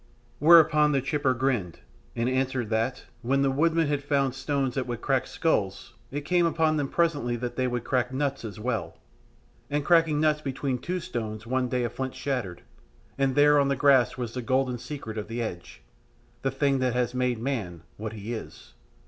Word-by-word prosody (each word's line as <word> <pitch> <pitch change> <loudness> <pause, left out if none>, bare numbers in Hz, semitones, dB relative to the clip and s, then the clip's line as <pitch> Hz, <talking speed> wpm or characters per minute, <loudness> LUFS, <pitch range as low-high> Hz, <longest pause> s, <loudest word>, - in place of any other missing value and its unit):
Whereon 150 -1 +6
the 135 - +2
chipper 135 -2 +1
grinned, 120 -9 -1 0.3
and 115 +1 0
answered 130 -3 -1
that, 115 +4 -1 0.2
when 135 +3 +1
the 135 - +2
woodmen 165 +4 +2
had 145 -1 -1
found 140 -2 +1
stones 135 -1 -1
that 130 -1 -2
would 120 -2 -4
crack 135 +1 0
skulls, 110 - -1 0.2
it 145 +2 -4
came 175 0 +3
upon 160 -1 +1
them 145 -2 0
presently 145 -9 +1
that 120 0 -4
they 130 0 0
would 120 -1 -2
crack 125 -1 0
nuts 135 0 -2
as 110 -2 -7
well. 125 +4 -3 0.7
And 145 0 -1
cracking 165 -3 +4
nuts 155 -1 +2
between 135 -2 -2
two 180 +1 -3
stones 110 -6 -5
one 130 +1 0
day 125 0 0
a 120 - -1
flint 130 0 -4
shattered, 125 -11 -3 0.5
and 135 -1 0
there 145 0 +6
on 140 - +3
the 140 - +1
grass 135 -3 +4
was 120 -2 -4
the 125 - -3
golden 130 0 0
secret 115 -6 -6
of 105 - -6
the 115 +2 -5
edge 85 - -6 0.6
the 135 - 0
thing 135 0 +1
that 125 -1 0
has 125 -1 0
made 125 -1 0
man 110 - -4
what 110 +1 -5
he 110 +2 -6
is. 110 - -9
130 Hz, 190 wpm, -27 LUFS, 120-145 Hz, 0.7 s, Whereon